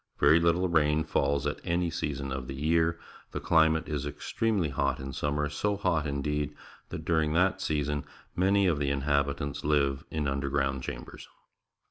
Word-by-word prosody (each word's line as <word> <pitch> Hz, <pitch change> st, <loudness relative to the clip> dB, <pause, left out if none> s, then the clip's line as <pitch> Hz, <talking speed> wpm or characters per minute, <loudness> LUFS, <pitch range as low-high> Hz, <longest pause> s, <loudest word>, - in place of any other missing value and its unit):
Very 75 Hz, +3 st, +6 dB
httle 85 Hz, +1 st, +2 dB
rain 75 Hz, 0 st, +3 dB
falls 70 Hz, -1 st, 0 dB
at -, -, -2 dB
any 85 Hz, 0 st, 0 dB
season 70 Hz, -3 st, -3 dB
of 65 Hz, -2 st, -5 dB
the 65 Hz, -, -5 dB
year. 80 Hz, +3 st, +1 dB, 0.3 s
The -, -, -2 dB
climate 80 Hz, -1 st, +3 dB
is 75 Hz, -3 st, -2 dB
extremely 100 Hz, +4 st, -1 dB
hot 65 Hz, -, 0 dB
in 65 Hz, 0 st, -6 dB
summer, 75 Hz, +2 st, -1 dB
so 100 Hz, +8 st, -1 dB
hot, 85 Hz, -6 st, 0 dB
indeed, 75 Hz, +1 st, -2 dB, 0.3 s
that -, -, -6 dB
during 80 Hz, -2 st, +2 dB
that 95 Hz, +3 st, +2 dB
season 75 Hz, -3 st, -1 dB, 0.3 s
many 100 Hz, +2 st, +3 dB
of 80 Hz, -5 st, +2 dB
the 70 Hz, -1 st, 0 dB
inhabitants 70 Hz, 0 st, 0 dB
five 70 Hz, -2 st, +1 dB
in 80 Hz, -1 st, -2 dB
imderground 70 Hz, -1 st, 0 dB
chambers. -, -, -7 dB
75 Hz, 160 wpm, -29 LUFS, 70-85 Hz, 0.3 s, Very